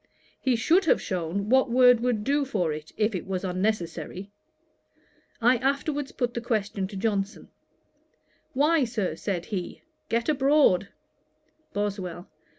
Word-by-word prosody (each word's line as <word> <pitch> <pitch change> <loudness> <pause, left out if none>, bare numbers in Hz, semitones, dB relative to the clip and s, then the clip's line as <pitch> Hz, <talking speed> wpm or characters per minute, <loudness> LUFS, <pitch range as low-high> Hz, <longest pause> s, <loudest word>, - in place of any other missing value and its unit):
'He 260 -2 +1
should 335 - +3
have - - +4
shewn 185 +2 -3
what 260 +2 +4
word 245 0 +6
would 235 -3 0
do 285 +4 +1
for 185 - -1
it, 155 +1 -8
if 215 +1 +1
it 185 - -4
was 190 -1 -3
unnecessary.' 185 -1 -3 1.1
I 245 +2 +4
afterwards 280 +2 -1
put 245 -2 -2
the 235 - -3
question 210 -5 -1
to 200 - -10
Johnson: 200 0 -2 1.0
'Why, 300 +3 +3
Sir, 225 -6 -2
(said 180 -4 -3
he,) 185 -4 -5 0.3
get 230 0 0
abroad.' 275 -10 +3 0.9
BOSWELL. 195 -3 -3
215 Hz, 135 wpm, -26 LUFS, 190-255 Hz, 1.1 s, word